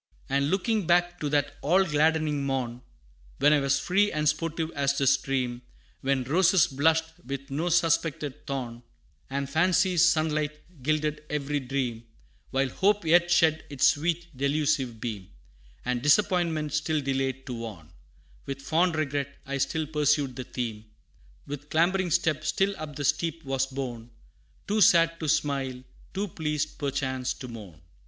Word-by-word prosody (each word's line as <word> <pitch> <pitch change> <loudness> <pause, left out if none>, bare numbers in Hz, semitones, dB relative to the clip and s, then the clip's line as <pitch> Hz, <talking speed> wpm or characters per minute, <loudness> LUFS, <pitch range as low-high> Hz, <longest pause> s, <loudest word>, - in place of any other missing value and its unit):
And 140 +1 +1
looking 200 +1 0
back 175 0 +2
to 150 - -2
that 145 0 0
all 180 +6 +4
gladdening 155 -2 +1
morn, 125 -3 -2 0.6
When 145 +2 +5
I 150 - +4
was 140 0 +1
free 205 +3 +2
and 150 0 0
sportive 160 +2 -1
as 140 -2 0
the 135 - +1
stream 130 -2 +1 0.4
When 135 -1 0
roses 175 +5 +4
blushed 160 +4 0
with 140 +1 -6
no 160 +6 -1
suspected 160 -4 0
thorn, 125 -4 -4 0.5
And 140 +1 -2
fancy's 175 +3 +3
sunlight 155 -3 +1 0.2
gilded 150 +1 -1
every 145 0 -1
dream 125 -3 -3 0.4
While 135 0 0
hope 200 +6 +1
yet 170 +2 +4
shed 160 -2 +3
its 140 -3 +1
sweet 170 +1 -2
delusive 140 -3 0
beam, 105 -5 -5 0.6
And 125 -1 -1
disappointment 160 -1 +2
still 155 0 0
delayed 135 -1 -2
to 125 - -5
warn 105 -9 -8 0.6
With 135 0 -4
fond 160 +5 +1
regret, 140 -2 -2
I 140 0 -3
still 160 +3 0
pursued 150 -3 +1
the 130 - -6
theme 110 -4 -5 0.6
With 145 +1 -7
clambering 180 +3 +2
step 160 -3 +1
still 195 +5 +1
up 150 -2 -7
the 145 - -3
steep 165 +3 0
was 135 0 0
borne, 125 -4 -6 0.6
Too 210 +1 +1
sad 165 -2 +5
to 155 - -2
smile, 135 -3 0 0.3
too 200 +2 -1
pleased 150 -2 -3
perchance 130 -3 -2
to 130 - -8
mourn. 105 -9 -10
145 Hz, 150 wpm, -27 LUFS, 135-165 Hz, 0.6 s, When